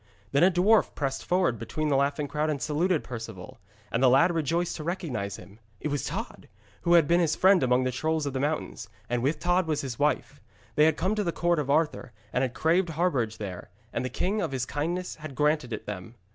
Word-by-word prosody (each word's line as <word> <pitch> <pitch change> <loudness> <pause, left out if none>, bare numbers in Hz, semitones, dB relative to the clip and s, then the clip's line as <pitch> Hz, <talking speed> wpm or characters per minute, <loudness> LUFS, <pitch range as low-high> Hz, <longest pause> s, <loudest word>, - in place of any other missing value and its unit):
Then 140 +4 +3
a 185 - +7
dwarf 195 +5 +3
pressed 135 -2 -2
forward 175 - +1
between 150 +7 -2
the 140 - +2
laughing 140 +2 +1
crowd 150 +2 -1
and 150 -2 -1
saluted 160 +4 0
Perceval. 115 -7 -8 0.3
And 115 - 0
the 130 - +6
lad 165 +8 +5
rejoiced 165 +2 0
to 155 - -6
recognise 130 - -3
him. 100 +2 -13 0.2
It 150 - -3
was 145 -1 -2
Tod, - - -6 0.3
who 170 - +2
had 165 -4 +5
been 170 +2 +4
his 165 -3 +2
friend 190 -1 +5
among 125 0 +3
the 130 - 0
trolls 155 +4 -1
of 140 - -3
the 130 - -2
mountains, 140 -7 -3 0.2
and 120 -1 +1
with 140 +6 +1
Tod 175 0 +1
was 155 -2 0
his 130 -4 -6
wife. - - 0 0.3
They 150 - +5
had 160 -1 +3
come 190 +3 0
to 210 -1 0
the 170 - 0
court 175 -1 +1
of 145 -2 -3
Arthur, 150 -5 0 0.2
and 125 - +1
had 130 -2 -1
craved 170 +2 +2
harbourage 140 -10 0
there, 95 -5 -7 0.2
and - - -1
the 130 - -2
king 205 +9 -1
of 165 -6 -2
his 130 -2 -1
kindness 170 +7 -3
had 155 -3 -8
granted 150 -3 +1
it 110 - -5
them. 105 +2 -7
150 Hz, 230 wpm, -27 LUFS, 130-170 Hz, 0.3 s, a